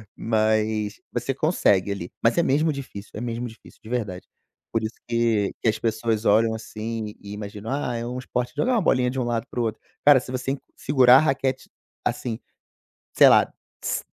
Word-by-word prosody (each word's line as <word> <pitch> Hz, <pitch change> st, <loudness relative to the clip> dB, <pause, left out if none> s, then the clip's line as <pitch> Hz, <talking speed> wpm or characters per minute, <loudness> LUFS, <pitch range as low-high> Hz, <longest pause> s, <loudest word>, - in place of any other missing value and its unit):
mas 110 Hz, -1 st, 0 dB
você 135 Hz, +3 st, -2 dB
consegue 105 Hz, -, +2 dB
ali. 90 Hz, -3 st, -5 dB
Mas 115 Hz, +8 st, +3 dB
é 170 Hz, -, +4 dB
mesmo 155 Hz, +1 st, +2 dB
difícil. 125 Hz, -7 st, -8 dB
É -, -, -6 dB
mesmo 120 Hz, 0 st, -3 dB
difícil, 110 Hz, 0 st, -15 dB
de 110 Hz, -, -11 dB
verdade. 105 Hz, -7 st, -3 dB, 0.4 s
Por 115 Hz, -, 0 dB
isso 110 Hz, -, -4 dB
que 115 Hz, -4 st, +1 dB
que 115 Hz, -, +3 dB
as -, -, 0 dB
pessoas 110 Hz, -1 st, -1 dB
olham 110 Hz, +2 st, +4 dB
assim 110 Hz, -1 st, -5 dB
e 100 Hz, 0 st, -8 dB
imaginam: 105 Hz, +1 st, -7 dB
"Ah, 135 Hz, -4 st, -1 dB
é 115 Hz, -, -3 dB
um 125 Hz, -, -4 dB
esporte 125 Hz, -1 st, -3 dB
jogar 255 Hz, +1 st, +1 dB
uma 225 Hz, -, +3 dB
bolinha 125 Hz, -6 st, +2 dB
de 130 Hz, -, -3 dB
um -, -, +1 dB
lado 120 Hz, 0 st, -1 dB
para 125 Hz, -, -4 dB
o -, -, +2 dB
outro". 110 Hz, -1 st, -2 dB, 0.3 s
Cara, 145 Hz, -3 st, +8 dB
se 125 Hz, -, -9 dB
você 130 Hz, +2 st, -2 dB, 0.2 s
segurar 130 Hz, -2 st, +6 dB
a -, -, +7 dB
raquete, 135 Hz, -3 st, 0 dB, 0.3 s
assim, 115 Hz, -2 st, -2 dB, 0.7 s
sei -, -, +7 dB
lá -, -, +5 dB, 0.3 s
s -, -, -1 dB
115 Hz, 195 wpm, -24 LUFS, 110-130 Hz, 0.7 s, Cara